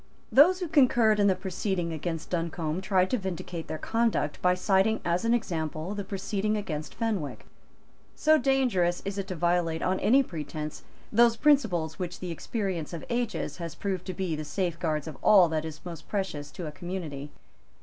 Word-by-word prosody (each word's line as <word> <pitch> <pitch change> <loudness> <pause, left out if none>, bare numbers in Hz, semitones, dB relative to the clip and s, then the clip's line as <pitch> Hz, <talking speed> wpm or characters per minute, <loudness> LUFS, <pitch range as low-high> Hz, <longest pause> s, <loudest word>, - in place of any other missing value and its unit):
Those 360 +7 +6
who 355 - -1
concurred 240 -8 +4
in 205 - +5
the 190 - +4
proceeding 185 -3 -2
against 165 +1 -4
Duncombe 165 -1 -2
tried 185 -2 +2
to 255 - +1
vindicate 175 -3 -5
their 155 - -4
conduct 225 -9 0
by 180 0 +4
citing 195 +3 +2
as 175 +5 +1
an 230 +1 +4
example 160 -4 -3
the 205 -1 -4
proceeding 200 +2 -1
against 155 -7 -5
Fenwick. 210 -11 -2 0.7
So 310 0 +4
dangerous 245 -12 +2
is 200 0 -3
it 195 - -3
to 185 - -4
violate, 170 -1 +1
on 185 +1 +1
any 270 +5 +5
pretence, 155 - -6 0.3
those 235 +1 +5
principles 200 - +2
which 180 -1 -4
the 180 -2 -4
experience 180 -2 -3
of 165 - -6
ages 235 -2 -2
has 170 -3 -6
proved 190 -3 -3
to 185 - -3
be 185 -4 -1
the 155 - -4
safeguards 165 -1 -2
of 155 - -8
all 190 -4 +7
that 160 0 -1
is 155 +1 -8
most 170 -3 -8
precious 190 -8 -3
to 175 - -6
a 150 - -5
community. 155 -4 -6
185 Hz, 180 wpm, -28 LUFS, 160-210 Hz, 0.7 s, all